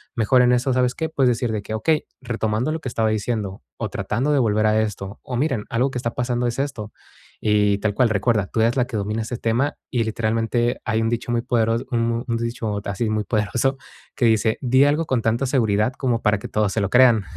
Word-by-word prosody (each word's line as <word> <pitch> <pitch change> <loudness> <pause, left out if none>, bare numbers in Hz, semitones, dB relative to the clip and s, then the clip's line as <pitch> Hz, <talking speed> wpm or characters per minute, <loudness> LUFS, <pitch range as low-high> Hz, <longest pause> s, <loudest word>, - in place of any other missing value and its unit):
mejor 125 +2 +3
en 125 0 +4
eso, 125 +1 +2
¿sabes 125 0 +1
qué?, 160 - -2
puedes 135 -5 +2
decir 120 -1 -1
de 105 - -2
que: 110 +2 -5
"Okey, 155 +8 +1 0.2
retomando 115 +3 -1
lo 160 - -4
que 130 - -4
estaba 115 -2 0
diciendo, 110 -2 -2 0.2
o, 110 - -2
tratando 110 +9 -1
de 145 - +3
volver 110 -3 +2
a 110 0 +3
esto, 100 -1 -5
o, 125 -2 -4
miren, 135 -6 0
algo 125 +4 +1
que 125 - -4
está 115 -1 -3
pasando 125 0 -1
es 120 - -3
esto". 125 -7 -3 0.5
Y 105 -1 +3
tal 105 -1 -1
cual 125 0 +3
recuerda, 105 0 +1
tú 110 - -1
eres 115 +1 +2
la 125 - +3
que 120 -4 -5
domina 105 +2 -2
ese 120 +2 -5
tema, 120 +6 0
y 120 -2 0
literalmente 115 +2 0
hay 115 -1 0
un 115 - +1
dicho 120 +1 -2
muy 120 -1 +1
podero 115 -1 +1
un 115 0 0
dicho 115 -3 -3
así 100 +3 -2
muy 110 -1 0
poderoso, 120 +5 0 0.4
que 120 - +1
dice: 110 -1 +2
"Di 130 +1 +4
algo 150 +3 +1
con 130 -5 0
tanta 115 +4 +1
seguridad 110 -3 +1
como 120 -3 0
para 105 -1 +2
que - - -7
todos 105 -2 0
se 110 - 0
lo 100 - 0
crean". 120 -5 +5
115 Hz, 230 wpm, -22 LUFS, 110-125 Hz, 0.5 s, crean